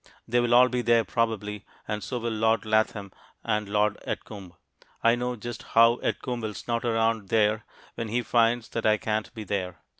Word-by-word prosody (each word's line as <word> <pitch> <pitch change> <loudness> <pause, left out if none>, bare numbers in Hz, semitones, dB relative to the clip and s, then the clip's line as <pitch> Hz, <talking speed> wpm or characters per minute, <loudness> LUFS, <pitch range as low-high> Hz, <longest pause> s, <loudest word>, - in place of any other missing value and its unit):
They 120 +1 +2
will 120 0 +3
all 125 +1 +7
be 125 -1 -1
there 115 -1 +3
probably, 105 -3 -2 0.2
and 105 -1 -3
so 125 - -3
will 120 -1 -2
Lord 110 +1 +1
Latham 110 -2 0 0.3
and 105 -2 -1
Lord 105 0 +1
Edgcumbe. 95 -5 -6 0.5
I 115 - +5
know 125 +1 -2
just 120 +1 -7 0.2
how 115 +1 +7
Edgcumbe 125 -2 -2
will 110 -2 -4
snort 115 +4 -3
around 115 -3 0
there 110 0 +2 0.3
when 115 - -4
he 120 +3 -1
finds 115 0 +2
that 115 - -1
I 110 0 +4
can't 110 0 -2
be 110 - -6
there. 95 -3 -3
110 Hz, 185 wpm, -26 LUFS, 105-120 Hz, 0.5 s, all